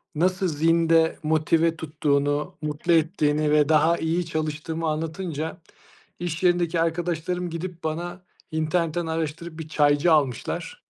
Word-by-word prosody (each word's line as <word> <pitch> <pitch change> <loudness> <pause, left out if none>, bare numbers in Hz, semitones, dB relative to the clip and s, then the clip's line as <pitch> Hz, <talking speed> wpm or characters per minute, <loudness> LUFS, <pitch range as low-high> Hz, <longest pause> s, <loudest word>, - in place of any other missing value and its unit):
nasıl 185 +3 +1
zinde, 165 +1 +3
motive 160 +1 +2
tuttuğunu, 145 -2 -1
mutlu 150 +3 0
ettiğini 155 -2 +2
ve 150 0 +4
daha 160 +2 +4
iyi 165 +2 -1
çalıştığımı 160 +1 -3
anlatınca, 160 0 -3 0.6
iş 175 0 -4
yerindeki 175 -2 +2
arkadaşlarım 175 +1 -1
gidip 170 +1 -6
bana, 175 +3 -4 0.3
internetten 165 +1 0
araştırıp 160 +1 -4
bir 160 - -6
çaycı 145 +2 +3
almışlar. 135 -6 -1
160 Hz, 115 wpm, -24 LUFS, 155-170 Hz, 0.6 s, ve